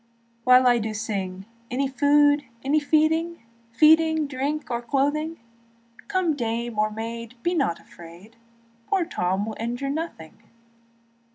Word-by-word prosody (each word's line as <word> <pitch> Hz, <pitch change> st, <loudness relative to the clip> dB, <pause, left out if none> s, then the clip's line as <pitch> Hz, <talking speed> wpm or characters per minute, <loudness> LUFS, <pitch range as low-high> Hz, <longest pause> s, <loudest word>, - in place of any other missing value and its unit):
But 255 Hz, 0 st, +6 dB
I 245 Hz, -1 st, +5 dB
do 215 Hz, 0 st, -3 dB
sing, 195 Hz, -3 st, -4 dB, 0.2 s
Any 270 Hz, +3 st, 0 dB
food, 290 Hz, +2 st, +3 dB, 0.2 s
any 290 Hz, +3 st, +2 dB
feeding, 320 Hz, +1 st, +1 dB, 0.3 s
Feeding, 315 Hz, +4 st, +4 dB
drink, 285 Hz, +1 st, -3 dB
or 235 Hz, 0 st, -1 dB
clothing; 290 Hz, +6 st, -1 dB, 0.7 s
Come 370 Hz, -6 st, 0 dB
dame 235 Hz, -2 st, -3 dB
or 215 Hz, 0 st, +2 dB
maid, 230 Hz, +2 st, -6 dB
be 350 Hz, -, +1 dB
not 275 Hz, -, 0 dB
afraid, 175 Hz, +6 st, -15 dB, 0.5 s
Poor 380 Hz, -4 st, +1 dB
Tom 190 Hz, -, -1 dB
will 220 Hz, -1 st, -5 dB
injure 245 Hz, +4 st, -3 dB
nothing. 250 Hz, -, -6 dB
260 Hz, 125 wpm, -24 LUFS, 225-305 Hz, 0.7 s, But